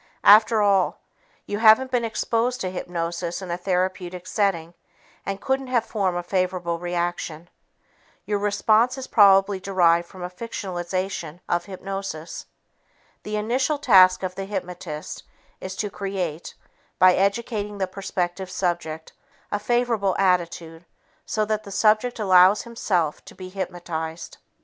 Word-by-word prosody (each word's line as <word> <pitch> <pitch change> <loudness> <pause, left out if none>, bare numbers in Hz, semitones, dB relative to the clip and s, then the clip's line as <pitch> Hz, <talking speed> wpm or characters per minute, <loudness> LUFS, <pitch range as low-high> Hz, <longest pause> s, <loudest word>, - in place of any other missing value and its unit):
After 215 +1 +7
all, 195 -3 +2 0.5
you 205 - -3
haven't 225 +4 +6
been 245 -2 +1
exposed 230 +2 -1
to 185 - -2
hypnosis 170 -1 -4
in 185 -3 -6
a - - 0
therapeutic 180 -1 -2
setting 185 -4 -1 0.5
and 195 0 -3
couldn't 265 +2 -1
have 240 -3 +1
formed 190 -5 -1
a 175 - -3
favorable 180 -2 -1
reaction. 175 -1 -3 0.7
Your 205 -1 -1
response 215 +5 +2
is 265 - -5
probably 195 -3 +5
derived 175 -3 +2
from 185 0 -10
a 180 - -4
fictionization 185 -5 -4
of 175 - 0
hypnosis. 195 -4 -6 0.7
The 210 - -5
initial 250 +8 0
task 190 -9 +5
of 185 -1 -2
the 195 +1 -5
hypnotist 180 -5 -6 0.4
is 185 0 -6
to 205 +1 -3
create, 185 -6 -4 0.4
by 185 0 +6
educating 205 +1 -1
the 195 - 0
prospective 185 -1 -4
subject, 170 -4 -3 0.4
a 205 - 0
favorable 230 -4 0
attitude 170 -3 0 0.4
so 215 -2 0
that 215 0 -1
the 200 - -10
subject 215 +4 +2
allows 190 -1 +5
himself 185 -9 -1
to - - -13
be 185 -1 -9
hypnotized. 175 -3 -5
190 Hz, 135 wpm, -24 LUFS, 175-210 Hz, 0.7 s, After